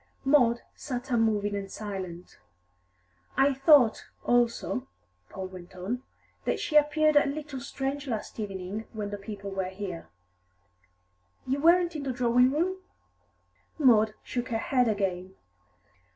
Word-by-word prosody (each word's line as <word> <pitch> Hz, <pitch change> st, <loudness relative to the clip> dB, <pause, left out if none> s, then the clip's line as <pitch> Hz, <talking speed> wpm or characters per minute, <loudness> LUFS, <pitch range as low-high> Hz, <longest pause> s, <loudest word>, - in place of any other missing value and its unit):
Maud 245 Hz, -4 st, +4 dB
sat 255 Hz, -1 st, -5 dB
unmoving 215 Hz, -3 st, +2 dB
and 195 Hz, -1 st, -4 dB
silent. 190 Hz, -4 st, -7 dB, 1.0 s
"I 270 Hz, +1 st, +4 dB
thought, 270 Hz, -3 st, +5 dB, 0.2 s
also," 240 Hz, -, +1 dB, 0.4 s
Paul 190 Hz, -, -6 dB
went 185 Hz, -1 st, -12 dB
on, 200 Hz, +8 st, -3 dB, 0.4 s
"that -, -, -1 dB
she 305 Hz, -, -3 dB
appeared 300 Hz, +1 st, +4 dB
a 290 Hz, -, +5 dB
little 285 Hz, -1 st, -5 dB
strange 275 Hz, +1 st, -4 dB
last 225 Hz, -2 st, -4 dB
evening, 200 Hz, +1 st, -4 dB
when 210 Hz, -2 st, -4 dB
the 205 Hz, -, -5 dB
people 200 Hz, -1 st, -7 dB
were 190 Hz, -1 st, -2 dB
here. 190 Hz, -3 st, -6 dB, 1.4 s
You 265 Hz, +2 st, -1 dB
weren't 345 Hz, +1 st, +4 dB
in 300 Hz, -, -3 dB
the 275 Hz, -2 st, -2 dB
drawing 245 Hz, 0 st, +4 dB
room?" 350 Hz, +6 st, 0 dB, 1.0 s
Maud 220 Hz, -7 st, +4 dB
shook 245 Hz, -1 st, -4 dB
her 225 Hz, -, 0 dB
head 250 Hz, +2 st, +2 dB
again. 190 Hz, -3 st, -2 dB
235 Hz, 130 wpm, -28 LUFS, 200-275 Hz, 1.4 s, thought